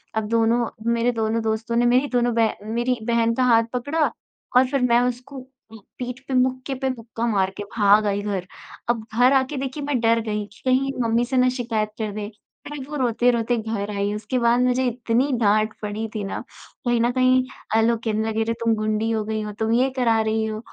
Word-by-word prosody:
अब 220 -1 -1
दोनों, 230 +1 +2 0.2
मेरे 235 +1 +2
दोनों 225 -1 -1
दोस्तों 225 +1 -2
ने 240 +1 +3
मेरी 250 +4 +3
दोनों 245 -1 +2
बह 225 -1 +2 0.2
मेरी 240 +1 0
बहन 230 -1 +2
का 255 - +1
हाथ 230 -2 +5
पकड़ा 290 +5 0 0.5
और 255 +1 +5
फ़िर 275 0 -1
मैं 240 -1 +4
उसको 250 +2 -3 0.3
पीठ 245 +4 -8
पे 270 - -4
मुक्के 255 +1 0
पे 265 - +1
मुक्का 235 -2 -4
मार 195 -4 +1
के 205 - -4
भाग 205 0 +5
आई 200 0 0
घर। 200 -3 -3 0.4
अब 235 -2 +1
घर 250 +4 +4
आके 270 +2 +1
देखिए 270 +2 -4
मैं 280 -3 0
डर 230 0 +3
गई 210 -1 -2
कि - - -20
कहीं 260 +1 +2
मम्मी 230 +1 +1
से 260 +1 -2
ना 255 0 +4
शिकायत 230 -4 -2
कर 215 -2 -2
दे। 210 0 -4 0.4
फ़िर 290 -3 -6
वो 300 - -5
रोते-रोते 240 -1 +1
घर 220 -2 -3
आई 200 +1 -1
उसके 210 +4 -3
बाद 235 0 +3
मुझे 250 +1 +2
इतनी 245 +3 0
डाँट 215 +1 +3
पड़ी 210 +1 -3
थी 210 - -2
ना, 195 - -4 0.5
कहीं 240 -1 +2
न 240 +1 +2
कहीं 255 0 +3 0.3
अ, 225 - +5
लोग 230 0 +2
कहने 220 -1 -1
लगे 220 0 -1
अरे 230 - -1
तुम 230 -1 +3
गुंडी 215 +1 -1
हो 220 -1 0
गई 220 0 -2
हो, 210 0 -5
तुम 220 +2 -2
ये 255 +3 +3
करा 230 -3 +3
रही 220 0 0
हो। 215 0 -4
230 Hz, 215 wpm, -23 LUFS, 220-250 Hz, 0.5 s, हाथ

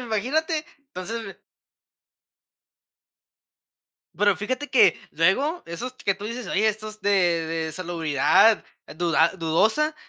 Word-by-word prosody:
imagínate. 290 - -1
Entonces 225 -5 -7 2.8
Pero 205 -2 +3
fíjate 255 +7 -4
que 205 -9 +5
luego 265 - +1
esos 240 +10 -5
que 195 -5 -1
tú 200 +2 -10
dices, 235 +3 -5
oye, 210 +3 +1
estos 215 0 -5
de 205 - 0 0.4
de 160 -1 -3
salubridad 170 +4 +2 0.3
duda 165 -1 +2
dudosa 220 - +1
210 Hz, 100 wpm, -24 LUFS, 175-255 Hz, 2.8 s, que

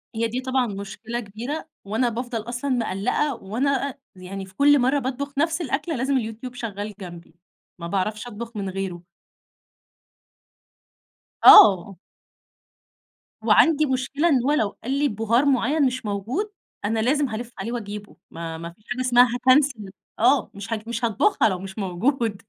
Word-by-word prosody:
هي 230 +1 0
دي 245 +3 -3
طبعًا 260 -1 0
مشكلة 210 +3 -6
كبيرة، 240 +9 -6 0.2
وأنا 225 +5 0
بافضل 240 0 -4
أصلًا 250 +4 -3
مقلقة 240 +5 0
وأنا 260 +7 -1
أ 265 - -11 0.2
يعني 190 +1 -7
في 190 0 -18
كل 290 0 +5
مرة 265 +3 +2
باطبخ 275 +2 -4
نفس 325 +3 +1
الأكله 315 +3 -2
لازم 265 +2 0
اليوتيوب 235 +1 -5
شغال 210 -3 -5
جنبي، 170 -3 -10 0.4
ما 170 - -5
باعرفش 210 +5 -2
أطبخ 230 0 -8
من 195 -2 -3
غيره. 185 -2 -5 2.4
آه. 195 -1 +8 1.5
وعندي 310 -2 +4
مشكلة 270 +4 0
إن 260 -6 +3
هو 280 - +2
لو 220 -9 0
قال 255 - -3
لِي 295 - +3
بهار 225 +3 +1
معين 280 +2 +2
مش 255 -2 -2
موجود، 230 - -3 0.3
أنا 220 +2 0
لازم 275 +4 +1
هالَف 230 +2 -5
عليه 235 - -4
وأجيبه، 210 -3 -6 0.2
ما 165 0 -6
ما 170 +1 -7
فيش 210 - -31
حاجة 245 +1 -2
اسمها 250 -1 +5
هاكنسل 260 0 +3
ال 200 -2 -9 0.3
آه 245 +3 +3
مش 205 +3 -6
ه 215 -1 -4
مش 235 0 -2
هاطبُخها 225 - +2
لو 185 -2 -3
مش 190 +2 -9
موجود. 210 +3 -1
235 Hz, 155 wpm, -23 LUFS, 205-265 Hz, 2.4 s, آه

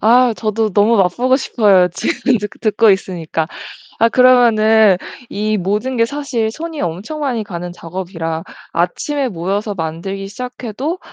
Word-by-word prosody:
아, 240 +2 +4
저도 215 0 -1
너무 210 +4 +4
맛보고 240 +8 +2
싶어요. 200 -9 +3
지금 265 - 0
드 210 - -4
듣고 215 +1 +2
있으니까. 170 -4 -1 0.5
아, 230 - +5
그러면은 225 -5 +5 0.3
이 215 +1 -1
모든 210 +7 -1
게 230 - +4
사실 245 -4 -2
손이 320 +4 -6
엄청 185 - -4
많이 255 -7 -1
가는 175 -3 -6
작업이라 165 -2 -5 0.3
아침에 265 - -1
모여서 200 +3 -2
만들기 190 +3 -4
시작해도 250 - -5
215 Hz, 300 characters per minute, -17 LUFS, 185-245 Hz, 0.5 s, 아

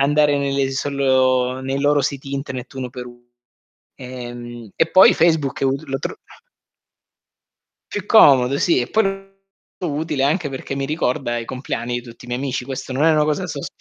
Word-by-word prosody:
andare 145 +1 +3
nelle 140 -1 0
solo 130 -2 +1
nei 135 +1 -3
loro 145 0 +3
siti 140 0 -4
internet 130 -2 -6
uno 130 -1 -4
per 125 0 -8
uno. 120 0 -15 0.7
Ehm, 120 -3 -8
e 165 - +1
poi 185 - +8
Facebook 160 -5 +1
è - - 0
ut 135 +2 0
lo 135 0 -2
tro - - -5 1.8
più 205 -1 -4
comodo, 140 - +6
sì, 165 -5 +2
e 120 - -3
poi 220 - +2
lo 195 - +2 0.7
trovo 165 -5 -3
molto 145 - -2
utile 135 - 0
anche 155 +2 +1
perché 135 0 -6
mi 135 0 -2
ricorda 130 -5 -1
i 115 - -5
compleanni 125 -1 -4
di - - -18
tutti 120 0 -13
i - - -12
miei 125 +1 -3
amici. 130 -2 -3
Questo 130 0 -6
non 135 +4 +1
è 160 - +5
una 150 -1 +3
cosa 150 -1 -1
da - - -3
sos - - -5
135 Hz, 195 wpm, -20 LUFS, 125-145 Hz, 1.8 s, poi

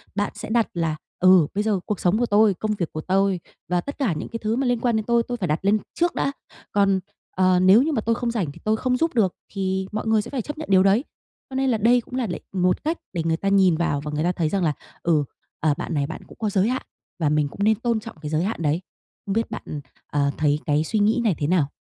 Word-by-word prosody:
bạn 205 0 0
sẽ - - -7
đặt 230 0 +2
là 165 -3 -1 0.2
"Ừ, 185 -4 +6
bây 205 +1 0
giờ 210 -3 +1
cuộc 210 - -2
sống 180 +4 +2
của 240 - +2
tôi, 210 -1 +4
công 215 +4 -3
việc 175 -5 -3
của 155 - -4
tôi 190 +1 +1 0.3
và 180 -1 +1
tất 285 - -7
cả 245 -11 +1
những 155 - -5
cái 230 - -5
thứ 215 +1 +1
mà 265 +1 0
liên 245 -1 +1
quan 235 -1 +1
đến 220 -1 -1
tôi, 235 0 +3
tôi 245 +1 -4
phải 190 -6 -2
đặt 155 0 0
lên 205 +2 +4 0.2
trước 345 0 0
đã, 275 - 0 0.4
còn, 195 -1 +3 0.3
ờ, 185 -1 +3
nếu 190 +6 +7
như 315 - 0
mà 265 - 0
tôi 230 +1 +1
không 235 0 -2
rảnh 190 -11 -2
thì - - -14
tôi 215 0 +2
không 250 +2 0
giúp 330 +4 0
được 195 -6 +2 0.2
thì 190 -1 -1
mọi 215 +1 -3
người 220 -1 +3
sẽ - - -9
phải 270 - -1
chấp 295 +7 -7
nhận 310 - -7
điều 190 -1 +6
đấy." 200 +6 +4 0.5
Cho 265 - -8
nên 265 0 +1
là 235 - +2
đây 240 +3 +4
cũng 250 - -9
là 255 -3 0
để 175 - -4
một 180 -1 +1
cách 320 +3 -1 0.2
để 170 -3 -1
người 165 -1 +1
ta 195 - -3
nhìn 190 -4 +4
vào 150 -4 0
và 150 +1 -5
người 150 +1 -1
ta 175 - +2
thấy 165 -3 -1
rằng 195 0 0
là 155 -3 +2 0.3
"Ừ, 160 -3 +3 0.4
ờ, 155 -1 +2
bạn - - -4
này 140 -2 0
bạn 160 - -7
cũng - - -15
có 215 - 0
giới 200 +2 +2
hạn 255 +1 -2 0.4
và 155 -3 +2
mình 150 -1 +2
cũng 200 +8 -5
nên 220 +1 +4
tôn 235 +1 0
trọng 225 +1 -10
cái 150 - -5
giới 155 +2 +1
hạn 205 -1 -2
đấy." 155 +3 +1 0.4
Không 195 - -2
biết 225 +2 -1
bạn, - - -5 0.5
ờ, 140 -1 +1
thấy 150 -1 +2
cái 150 +1 +2
suy 215 +7 -1
nghĩ 215 +4 +3
này 210 -7 +2
thế 145 - 0
nào? 165 -4 +2
195 Hz, 285 wpm, -23 LUFS, 170-230 Hz, 0.5 s, nếu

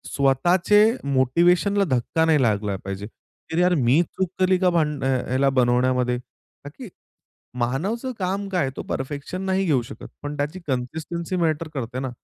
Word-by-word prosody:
स्वतःचे 175 +9 +3 0.2
मोटिवेशनला 170 +9 +2
धक्का 160 +7 0
नाही 155 -3 +3
लागला 105 -4 +1
पाहिजे. 100 +1 -5 0.4
तर, 160 - -2
यार 180 +1 +4
मी 135 +2 +3
चूक 190 +1 -3
केली 185 0 +3
का 185 -1 +3
भान 150 -4 0
अ, - - +1 0.2
याला 135 +1 +3
बनवण्यामध्ये, 125 -1 +2
का 140 +3 -16
की 250 -5 -8 0.7
मानवचं 195 - -2
काम 195 +2 -2
काय 185 -2 0
आहे? 135 - -1
तो - - -4
परफेक्शन 145 +7 -4
नाही 190 0 0
घेऊ 140 -7 +2
शकत. 115 - -10
पण, 145 0 -5
त्याची 150 +6 -3
कन्सिस्टन्सी 160 +7 -3
मॅटर 160 -2 0
करते 125 -1 -4
ना. 130 -1 -3
150 Hz, 160 wpm, -23 LUFS, 130-180 Hz, 0.7 s, यार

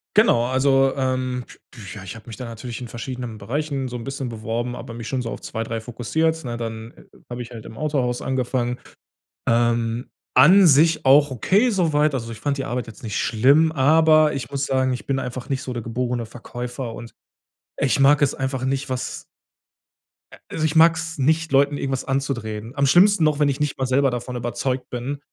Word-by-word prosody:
Genau, 165 - +4
also, 135 +1 +3
ähm, 130 -2 -1 0.3
du, 125 - -14
ja, 100 -3 -9
ich 95 +3 -8
habe 110 - -13
mich 110 - -8
da 125 - -6
natürlich 115 +1 -7
in 120 - -6
verschiedenen 120 -1 -6
Bereichen 135 +5 -3
so 125 0 -5
'n 115 - -7
bisschen 135 -2 -4
beworben, 115 +2 -3
aber 115 - -8
mich 115 -1 -7
schon 130 -2 -2
so 115 - -4
auf - - -6
2, 115 0 -4
3 115 0 -4
fokussiert, 160 +8 -1
ne? 120 -2 -4
Dann 115 -1 -6 0.4
habe 120 0 -5
ich 120 +1 -9
halt 115 -2 -9
im 110 - -10
Autohaus 130 -5 -1
angefangen. 125 -1 -1 0.7
Ähm, 115 0 +1 0.3
an 180 +9 +7
sich 155 +2 +4
auch 140 +1 +6
okay 195 - +2
so 175 -6 +1
weit, 150 -1 +2
also, 115 -2 -3
ich 110 - -8
fand 140 -1 -1
die 135 - -2
Arbeit 125 -2 -3
jetzt 110 -2 -12
nicht 110 -3 -3
schlimm, 140 +8 +3
aber 155 +1 +4
ich 135 - -5
muss 140 0 -2
sagen, 130 -1 +1
ich 125 - -5
bin 135 -1 0
einfach 125 -1 -5
nicht 135 -1 -2
so 125 - -5
der 120 -2 -4
geborene 120 0 -2
Verkäufer 120 +1 -6
und 115 -1 -9 0.6
ich 140 0 +1
mag 140 +1 +5
es 140 - +2
einfach 130 -1 -3
nicht, 135 +1 -1
was 130 -1 -4 1.1
a - - -12
also, 155 - -2
ich 155 - -1
mag's 165 0 +4
nicht, 160 +3 +1
Leuten 140 +1 +3
irgendwas 135 -1 -2
anzudrehen. 120 -5 -3
Am 140 0 +2
schlimmsten 180 +4 +5
noch, 150 -1 +2
wenn 145 -1 +3
ich 140 +2 -2
nicht 150 -1 -1
mal 130 - -1
selber 135 +1 +3
davon 125 +1 -5
überzeugt 125 +2 -3
bin. 130 +4 -4
130 Hz, 205 wpm, -22 LUFS, 120-145 Hz, 1.1 s, an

